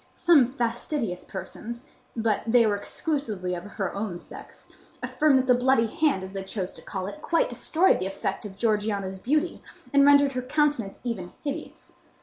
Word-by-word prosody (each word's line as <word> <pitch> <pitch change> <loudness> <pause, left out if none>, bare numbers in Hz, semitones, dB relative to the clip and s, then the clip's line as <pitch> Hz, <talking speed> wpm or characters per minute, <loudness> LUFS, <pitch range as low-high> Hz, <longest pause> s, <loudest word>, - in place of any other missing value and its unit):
Some 320 -8 +5
fastidious 235 - -2
persons—but 225 - -5
they 235 0 +5
were 210 -1 +2
exclusively 210 - -2
of 175 0 -5
her 200 -2 -4
own 200 -3 -3
sex—affirmed 295 - -2
that 260 - +2
the 255 - +5
bloody 245 -1 +3
hand, 280 - +1
as 190 +1 -8
they 195 - -3
chose 190 -1 -4
to - - -11
call 190 -2 -5
it, 205 +10 -7
quite 340 +12 +1
destroyed 350 +4 +2
the 185 - -2
effect 195 0 -3
of 200 -2 -8
Georgiana's 205 -3 0
beauty, 305 - 0 0.3
and 280 0 +6
rendered 285 0 +6
her 255 -1 -2
countenance 265 -5 0
even 200 -8 -4
hideous. 285 -2 -6
230 Hz, 160 wpm, -26 LUFS, 195-280 Hz, 0.3 s, and